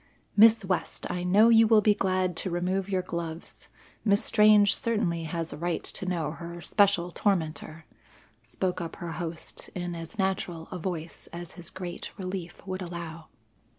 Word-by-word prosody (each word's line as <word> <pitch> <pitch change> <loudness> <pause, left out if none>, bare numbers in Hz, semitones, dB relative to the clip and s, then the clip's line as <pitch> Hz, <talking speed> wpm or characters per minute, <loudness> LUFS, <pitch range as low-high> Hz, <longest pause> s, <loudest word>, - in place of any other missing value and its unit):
"Miss 220 0 +7
West, 180 -3 -2
I 180 - -2
know 205 +6 +5
you 225 -1 +7
will 220 -1 +6
be 210 0 +5
glad 185 -3 0
to 190 - -1
remove 185 +2 -1
your 185 -2 0
gloves; 170 -2 -6 0.3
Miss 200 -1 +3
Strange 210 -2 +6
certainly 190 -8 -1
has 165 +1 -3
a - - -7
right 170 +2 -2
to 190 - -4
know 165 -4 -1
her 170 +1 -8
special 195 -1 +2
tormentor," 160 -4 -1 0.6
spoke 180 +10 -3
up 165 - -5
her 170 -1 -6
host 165 -1 -6
in 175 -1 -3
as 165 +5 -6
natural 185 -4 -1
a 185 - -4
voice 170 -2 -5
as 170 0 -6
his 175 -1 -8
great 180 -2 -7
relief 185 -2 -6
would 190 0 -4
allow. 170 -2 -7
180 Hz, 165 wpm, -28 LUFS, 170-195 Hz, 0.6 s, Miss